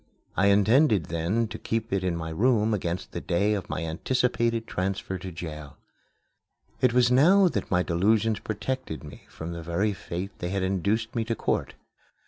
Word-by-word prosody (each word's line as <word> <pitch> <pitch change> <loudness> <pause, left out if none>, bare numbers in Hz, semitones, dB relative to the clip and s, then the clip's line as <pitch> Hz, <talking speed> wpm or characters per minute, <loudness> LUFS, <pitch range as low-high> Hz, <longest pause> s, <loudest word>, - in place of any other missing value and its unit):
I 95 - +3
intended 105 - +4
then 85 +8 0
to 110 - -7
keep 115 -2 -2
it 95 -1 +1
in 90 -2 0
my 80 -1 -4
room 110 +3 +2
against 90 -2 -3
the - - -5
day 100 +5 +1
of 100 -3 -4
my 80 - -3
anticipated 115 +6 0
transfer 95 -1 -3
to 95 +1 -7
jail. 75 -3 -8 1.0
It 130 - +4
was 125 0 +4
now 180 +10 +6
that - - -3
my 90 -1 +2
delusions 105 +5 +2
protected 110 - -4
me 75 - -12
from 80 +1 -7
the 85 - -6
very 85 +6 0
fate 95 +1 -5
they 90 - -3
had 95 0 -1
induced 100 +5 0
me 115 - +1
to 115 0 -1
court. - - -1
100 Hz, 175 wpm, -27 LUFS, 85-115 Hz, 1.0 s, now